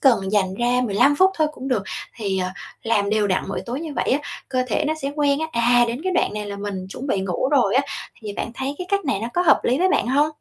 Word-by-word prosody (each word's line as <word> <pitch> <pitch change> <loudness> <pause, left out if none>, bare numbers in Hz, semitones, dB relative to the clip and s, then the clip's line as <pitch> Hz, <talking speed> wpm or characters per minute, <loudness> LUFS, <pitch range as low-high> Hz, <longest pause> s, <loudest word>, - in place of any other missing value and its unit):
cần 220 -8 +3
dành 190 -3 +2
ra 245 +3 +1
15 235 +7 +3
phút 375 +4 +5
thôi 310 - +4
cũng 270 -1 -7
được. 235 -6 +1 0.3
Thì, 200 -4 -1
à, 185 0 -2 0.3
làm 210 -3 +1
đều 215 -1 +2
đặn 185 -2 +1
mỗi 195 - -3
tối 250 +5 -3
như 315 -3 -6
vậy 240 - 0
á, 270 - +3 0.3
cơ 255 -1 0
thể 300 - 0
nó 310 - +1
sẽ 280 +1 -2
quen 285 -1 +2
á, 320 - 0
à, 240 +1 +4
đến 235 +3 -3
cái 375 - 0
đoạn 355 - +1
này 210 -1 -4
là 200 0 -5
mình 200 -2 -5
chuẩn 255 +8 -7
bị 200 -8 0
ngủ 190 +7 -1
rồi 275 -4 +3
á. 270 - +4 0.4
Thì 210 -2 -6
bạn 230 +3 -4
thấy 270 +3 -3
cái 360 - -5
cách 400 -2 +1
này 270 -9 0
nó 230 - -3
có 355 - +3
hợp 345 - +5
lý 255 +4 +2
với 370 - +3
bạn 375 - +2
hông? 285 +3 +4
245 Hz, 285 wpm, -22 LUFS, 205-285 Hz, 0.4 s, phút